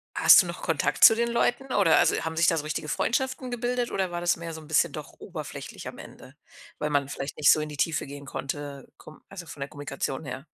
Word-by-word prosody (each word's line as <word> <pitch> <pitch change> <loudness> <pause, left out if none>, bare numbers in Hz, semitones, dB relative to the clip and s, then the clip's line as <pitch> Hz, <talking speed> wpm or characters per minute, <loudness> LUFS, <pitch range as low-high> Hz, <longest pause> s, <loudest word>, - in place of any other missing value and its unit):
hast - - +8
du - - -8
noch - - -7
Kontakt - - 0
zu 225 - +10
den 235 +1 0
Leuten, 245 +3 0
oder 170 -6 +4
also, - - +3
haben 160 0 -4
sich 170 - +4
da 165 - +3
so 150 - -2
richtige 155 0 -4
Freundschaften 255 - -1
gebildet? 245 0 -2
Oder 190 -2 -1
war 175 0 -4
das 175 0 +1
mehr 165 0 -7
so 160 - -8
'n 155 - -15
bisschen 160 - +2
doch - - -8
oberflächlich - - -8
am - - -8
Ende, - - -13 0.4
weil 150 - -2
man 140 -1 +1
vielleicht 135 0 -6
nicht 150 - +6
so - - +4
in 150 - -4
die 150 - -9
Tiefe 160 +2 0
gehen 140 0 -10
konnte. 140 0 -6
Komm 155 - -15
also, 180 -4 -9
von 145 - -10
der 140 - -4
Kommunikation 145 0 -5
her? 135 +1 -7
160 Hz, 245 wpm, -26 LUFS, 145-195 Hz, 0.4 s, zu